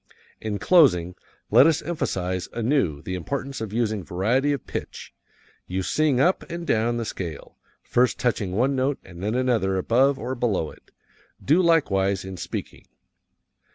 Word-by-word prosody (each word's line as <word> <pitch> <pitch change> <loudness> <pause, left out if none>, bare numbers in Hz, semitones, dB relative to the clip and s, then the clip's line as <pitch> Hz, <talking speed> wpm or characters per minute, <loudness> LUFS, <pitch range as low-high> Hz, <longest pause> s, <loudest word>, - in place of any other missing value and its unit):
In 105 -2 -3
closing, 95 - +4 0.4
let 140 - +7
us 165 - +1
emphasize 95 - -2
anew 115 - 0
the 95 - -5
importance 135 +8 -4
of 110 -3 -4
using 110 -3 -1
variety 115 - +1
of 140 - -3
pitch. - - -7 0.5
You 95 +1 -2
sing 145 - +1
up 175 +7 +3
and 170 0 -5
down 115 -1 +1
the 115 - -2
scale, 85 -7 -7 0.2
first 125 +1 +2
touching 105 -6 -1
one 130 +7 +1
note 135 +2 0
and 85 -1 -12
then 105 +4 -1
another 115 -7 +1
above 130 +8 +3
or 125 +1 -4
below 110 -10 -1
it. - - -19 0.6
Do 160 +7 +4
likewise 100 - +2
in 95 -1 -7
speaking. - - -6
115 Hz, 155 wpm, -24 LUFS, 95-135 Hz, 0.6 s, let